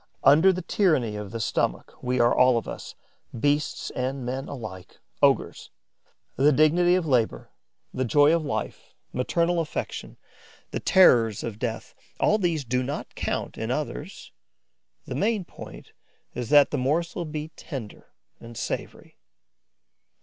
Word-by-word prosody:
Under 160 +8 +6
the 185 -1 -4
tyranny 155 - +1
of 105 -1 -6
the 115 - -5
stomach, 60 - -1
we 125 0 -1
are 120 0 +4
all 125 -1 +5
of 115 - -3
us, - - -8 0.4
beasts 145 +4 0
and 130 0 -3
men 130 +2 -4
alike, 110 -9 -8 0.2
ogres. - - +2 0.7
The 145 +3 +5
dignity 170 +5 +4
of 185 -2 0
labour, 125 -7 0 0.4
the 130 - -1
joy 145 +6 +4
of 165 - -1
life, 145 - -5 0.2
maternal 170 +7 +1
affection, 160 -2 -5 0.5
the - - -2
terrors 115 - +4
of 110 -2 -5
death: 115 -2 -4 0.3
all 215 - +3
these 165 -7 0
do 125 +2 0
not 135 +3 -5
count, - - -3
in - - -3
others; - - -5 0.7
the - - -6
main 205 - 0
point - - -11 0.4
is 120 -2 -5
that 145 -1 +6
morsel 160 +6 0
the 160 - -8
be 150 0 -4
tender 130 -11 -8 0.3
and 115 0 -11
savoury. - - -6
140 Hz, 140 wpm, -25 LUFS, 120-165 Hz, 0.7 s, Under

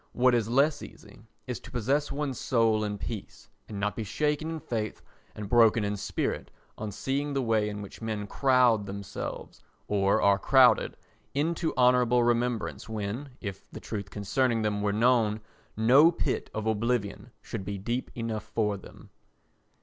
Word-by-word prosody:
What 125 0 +4
is 115 -2 +1
less 140 +4 +3
easy - - -13 0.2
is 125 -3 -4
to - - -13
possess 135 +5 0
one's 140 -3 -3
soul 115 -3 +2
in 105 -1 -3
peace 105 0 -7 0.2
and 105 - -5
not 105 0 -1
be 115 - -3
shaken 150 +8 -1
in 165 -1 -4
faith 110 -6 -4 0.3
and 105 -1 -6
broken 115 0 +5
in 105 0 -1
spirit 100 0 -3 0.3
on 105 -1 -5
seeing 140 +7 -2
the 135 - 0
way 110 -2 +1
in 105 0 -6
which 100 - -11
men 110 -2 -3
crowd 125 -3 +3
themselves, 100 0 -6 0.3
or 100 -1 +2
are 100 0 +4
crowded, 125 -1 +4 0.4
into 160 +3 0
honourable 125 -1 +4
remembrance 120 -1 -1
when, 110 +6 -4
if 100 -3 -7
the - - -9
truth 100 -3 -5
concerning 115 +3 0
them 105 -1 0
were 105 0 +1
known, 110 -1 +3 0.4
no 135 +9 +6
pit 150 -5 -2
of 110 0 -4
oblivion 110 -1 -1
should - - -6
be 100 +1 -4
deep 120 +6 -3
enough 115 -2 -3
for 105 -1 -1
them. - - -14
115 Hz, 165 wpm, -28 LUFS, 105-125 Hz, 0.4 s, no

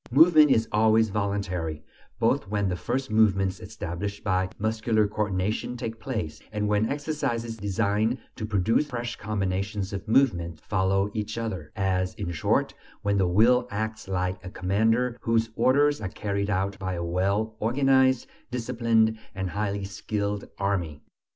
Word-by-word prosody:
Movement 155 +2 +7
is 115 -4 +3
always 110 +1 +4
voluntary, 100 -6 -2 0.3
both - - +1
when 100 0 0
the 90 - -1
first 125 +6 -3
movements 95 -3 +3
established 100 0 -5
by 95 -1 +1
"muscular 110 0 +1
coordination" 105 +3 -2
take 115 -1 -5
place, 110 - -4
and 105 -1 -1
when 105 +1 +2
exercises 140 -6 -2
designed 105 +3 0 0.2
to 110 - -4
produce 110 +8 +2
fresh 120 -2 -4
combinations 100 -1 -2
of 100 +2 -5
movements 90 - +2
(skill) - - -29
follow 95 0 +1
each 110 0 -3
other 95 -10 -4
as, 95 -1 0
in 85 - -4
short, 85 - +1 0.3
when 100 0 +1
the 95 - +3
will 120 +7 +4
acts 110 0 -4
like 90 0 -2
a 90 - -6
commander 110 +6 +1
whose 115 -1 +1
orders 145 +1 +3
are 100 - -3
carried 100 0 -2
out 100 0 -1
by 95 -2 -3
a 85 - -3
well 100 +5 0
organized, 130 +1 +3 0.2
disciplined, 115 -2 +1 0.2
and 95 -1 -3
highly 100 -1 -2
skilled 100 +1 -3
army. 90 -7 -2
105 Hz, 150 wpm, -26 LUFS, 95-115 Hz, 0.3 s, Movement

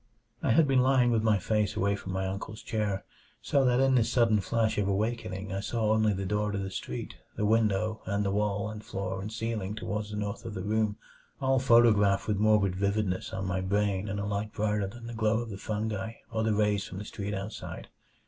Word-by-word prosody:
5 - - 0
I - - +5
had 160 +2 +5
been 135 -2 +4
lying 130 -2 +4
with 115 -2 +2
my 110 -2 +3
face 105 +1 0
away 100 +1 +1
from 95 -1 -7
my 95 0 -1
uncle's 100 +3 -5
chair, 105 -3 -2 0.3
so 140 -2 +2
that 125 0 +3
in 135 0 +4
this 120 -3 +3
sudden 115 -4 +4
flash 110 +2 0
of 100 - +1
awakening 100 -1 -2
I 95 - -1
saw 110 +1 0
only 110 -1 +3
the 95 -1 -2
door 105 +2 0
to 100 - -2
the 95 -1 -3
street, - - -5 0.2
the 105 - 0
window, 110 0 +2
and 100 +1 0
the 100 - +1
wall 105 0 0
and 110 0 -7
floor 95 -1 -4
and 105 +3 -5
ceiling 110 -3 -3
toward 105 -1 -3
the 105 - -6
north 105 0 -3
of 110 -2 -6
the - - -4
room, 105 0 0 0.4
all 135 0 +2
photographed 115 -6 +4
with 105 -2 +1
morbid 105 -3 +3
vividness 100 -1 -1
on 95 0 -3
my 95 0 -1
brain 100 +1 0
in 100 +1 -3
a 100 - -2
light 105 +1 -2
brighter 105 -2 0
than 115 +4 -10
the 120 - -6
glow 110 -1 +2
of 120 -2 -5
the 100 - -5
fungi 110 +1 -3 0.2
or 110 -1 -1
the 110 -1 +1
rays 105 -1 +2
from 95 - -8
the 105 - -6
street 105 0 -4
outside. 100 +2 -6
105 Hz, 225 wpm, -29 LUFS, 100-110 Hz, 0.4 s, I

